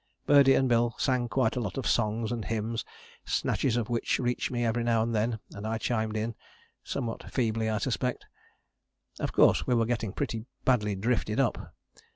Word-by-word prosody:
Birdie 140 -2 +6
and 135 - +3
Bill 120 -1 +2
sang 125 -2 +1
quite 130 +2 +1
a - - -1
lot 110 -1 -4
of 135 - -3
songs 110 0 +1
and 115 -3 -3
hymns, 115 0 -2 0.4
snatches 120 -3 0
of 115 -3 -1
which 120 -1 0
reached 125 -1 -1
me 120 -1 -1
every 115 +1 0
now 115 -1 +2
and 115 0 -2
then, 110 +1 0 0.2
and 100 +2 -6
I 110 0 -1
chimed 110 -1 -1
in, 110 +2 -2 0.5
somewhat 120 -5 -4
feebly 110 -3 0
I 110 - 0
suspect. 125 +1 -2 0.9
Of - - -2
course - - +4
we 125 - +3
were 115 -1 +3
getting 115 -3 -1
pretty 110 +2 -3 0.2
badly 105 -6 +2
drifted 110 +2 0
up. 130 -4 -1
115 Hz, 185 wpm, -29 LUFS, 110-125 Hz, 0.9 s, Birdie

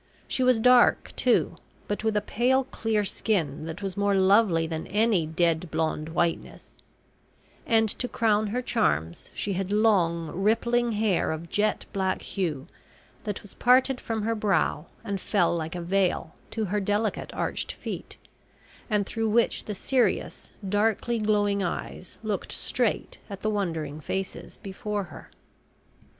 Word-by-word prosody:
She - - -1
was 255 -2 +4
dark, 250 +1 +5
too, - - +2 0.3
but 205 +1 -3
with 220 -1 +1
a - - +2
pale 260 +4 +2
clear 220 -4 -1
skin 160 -8 -1
that 165 +5 -6
was 195 -2 -3
more 200 0 +2
lovely 190 -3 +4
than 160 -1 -4
any 210 -5 +2
dead 165 +1 +1
blonde 160 0 -1
whiteness; 165 +1 -2 0.9
and 225 -1 +4
to 245 +4 -3
crown 215 -3 +1
her 245 +5 -2
charms, 80 - 0
she 200 - -2
had 190 +1 -2
long 180 -7 +2
rippling 235 +4 +1
hair 210 -6 +1
of 160 +2 -5
jet 210 +1 +1
black 190 -1 -1
hue 160 -8 -3 0.6
that 210 -2 -4
was 205 - -12
parted 255 +1 +3
from 225 -2 -3
her 225 +1 +1
brow 200 -6 0 0.2
and 200 -4 -3
fell 180 -5 +2
like 160 0 -4
a 175 - -3
veil 180 -2 0 0.2
to 220 -1 -2
her 205 +2 0
delicate 205 +2 -1
arched - - -2
feet, - - -7 0.7
and 210 -2 +1
through 225 +1 -1
which 230 +2 +2
the 210 - -4
serious, 255 +5 0 0.2
darkly 220 +3 +1
glowing 205 -2 +2
eyes 180 0 -5
looked 215 -2 -3
straight - - -1
at 200 -1 -7
the 215 - 0
wondering 160 -7 -2
faces 190 +5 -5
before 205 +1 -3
her. 155 -7 -12
205 Hz, 150 wpm, -27 LUFS, 175-220 Hz, 0.9 s, dark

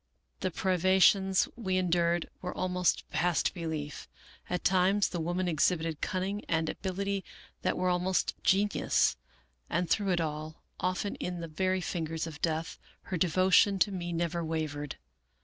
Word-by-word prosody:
The 185 - 0
privations 190 +2 +3
we 190 -6 -1
endured 175 -1 +1
were 180 - -5
almost 180 -1 +1
past 175 +2 +1
belief. 160 -5 -5 0.4
At 180 - -2
times 190 +2 +3
the 175 - -3
woman 175 +3 -1
exhibited 160 -1 +1
cunning 195 +3 -2
and 160 -1 +1
abil 190 -1 -5
ity 200 -1 -1 0.4
that - - 0
were 185 - 0
almost 180 +1 +1
genius; 200 +2 +3 0.5
and 180 - 0
through 200 +3 +1
it 175 -2 +2
all, 155 0 -4 0.2
often 185 +3 -1
in 180 -1 -4
the 165 - -5
very 185 +4 0
fingers 165 -2 -3
of 155 -3 -8
death, 160 0 -1 0.3
her 180 - 0
devotion 185 +4 +4
to 200 +2 +3
me 175 -2 -4
never 170 0 -1
wavered. 155 -3 -3
180 Hz, 150 wpm, -30 LUFS, 165-185 Hz, 0.5 s, devotion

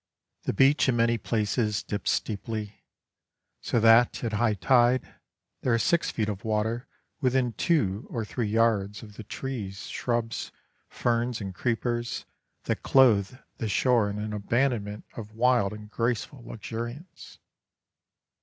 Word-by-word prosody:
The - - 0
beach 135 +5 +4
in 125 - +2
many 115 0 +2
places 105 -1 0
dips 105 -2 -3
steeply, 105 -1 -3 0.8
so 120 - 0
that, 115 +3 +5
at 115 -2 -2
high 110 0 +2
tide, 125 +3 +4 0.6
there 125 -2 +2
are - - +3
six 170 +8 +2
feet 110 -2 -1
of 100 -3 -4
water 110 +2 -1 0.3
within 130 -3 +1
two 115 - 0
or 115 -2 -3
three 115 +1 -2
yards 105 -2 +1
of 105 -2 -12
the 110 - -8
trees, 105 -5 -5
shrubs, 120 -2 -2 0.4
ferns, 120 0 0
and 95 -3 -5
creepers 120 +2 -2 0.4
that - - -2
clothe 120 -4 +4 0.2
the 110 - -3
shore 115 0 +3
in 100 - -4
an 105 0 -4
abandonment 105 -1 -1
of 110 -1 -8
wild 120 -4 +3
and 105 0 -10
graceful 120 +3 -2
luxuriance. 120 - -7
115 Hz, 135 wpm, -27 LUFS, 105-120 Hz, 0.8 s, that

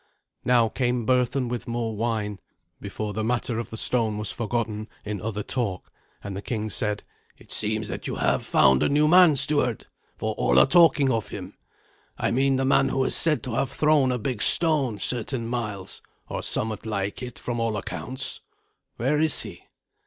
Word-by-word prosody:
Now 120 -2 +4
came 125 0 -1
Berthun 125 +1 +1
with 120 0 -5
more 115 -2 -2
wine, 105 -2 -2 0.4
before 105 -1 -5
the 110 +2 -2
matter 120 0 -1
of 115 - -5
the 110 - -7
stone 110 -3 +3
was 105 0 -1
forgotten 110 -2 -3 0.2
in 105 -2 -4
other 105 0 -3
talk, 105 -8 -2 0.3
and 100 -1 -6
the 100 - -5
king 110 -1 -3
said, 105 +1 +1 0.3
"It - - -16
seems 110 0 -1
that - - -5
you - - -3
have - - 0
found 65 -3 +4
a - - +2
new 150 +2 +3
man, 175 -2 +7
steward, 140 -4 0 0.3
for - - -2
all 60 - +2
are 65 - +8
talking 160 -6 +5
of 115 -3 -2
him. - - -8 0.6
I - - 0
mean 135 +2 +2
the 135 0 0
man 135 0 +3
who 135 - 0
is - - +1
said 155 -3 +2
to 125 - -5
have 130 - 0
thrown 145 -2 +3
a 125 - 0
big 120 -1 -3
stone 150 -9 +2
certain 120 +3 0
miles, 105 -6 -5 0.3
or - - -4
somewhat 110 0 -3
like 100 +2 -3
it, 125 -2 -7
from 120 -1 -4
all 115 -2 -1
accounts. 130 +5 -5 0.6
Where 135 +6 +1
is 155 -1 +2
he?" 100 -6 -11
115 Hz, 185 wpm, -25 LUFS, 105-130 Hz, 0.6 s, are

